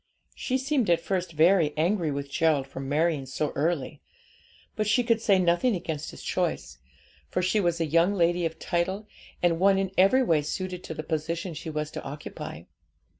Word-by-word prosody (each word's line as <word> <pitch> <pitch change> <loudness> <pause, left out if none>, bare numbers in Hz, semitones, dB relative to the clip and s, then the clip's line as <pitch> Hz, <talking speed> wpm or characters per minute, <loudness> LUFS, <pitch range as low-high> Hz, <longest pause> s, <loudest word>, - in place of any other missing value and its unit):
She 260 - -1
seemed 265 -5 0
at 170 -1 +4
first 185 0 -2
very 160 -1 +3
angry 170 +1 +1
with 140 0 -3
Gerald 155 -3 +2
for 135 - -9
marrying 145 +1 0
so 145 +3 -2
early; 150 -1 -2 0.7
but 215 -2 -1
she 220 +4 +3
could 230 -2 +1
say 200 -4 +4
nothing 185 +6 +2
against 160 -4 -4
his - - -11
choice, - - -2 0.5
for 180 - -1
she 185 +4 +2
was 175 -3 +1
a 165 - +1
young 165 +6 +3
lady 175 -1 +2
of 165 -1 -2
title, 190 +5 -2 0.4
and 170 -2 +3
one 195 +1 +4
in 195 -1 -1
every 225 +8 +5
way 165 -10 +2
suited 180 +4 -4
to 160 - -6
the 155 - -5
position 165 +3 -3
she 160 +1 -6
was 150 -1 -3
to - - -6
occupy. 145 +2 -7
170 Hz, 185 wpm, -27 LUFS, 155-195 Hz, 0.7 s, every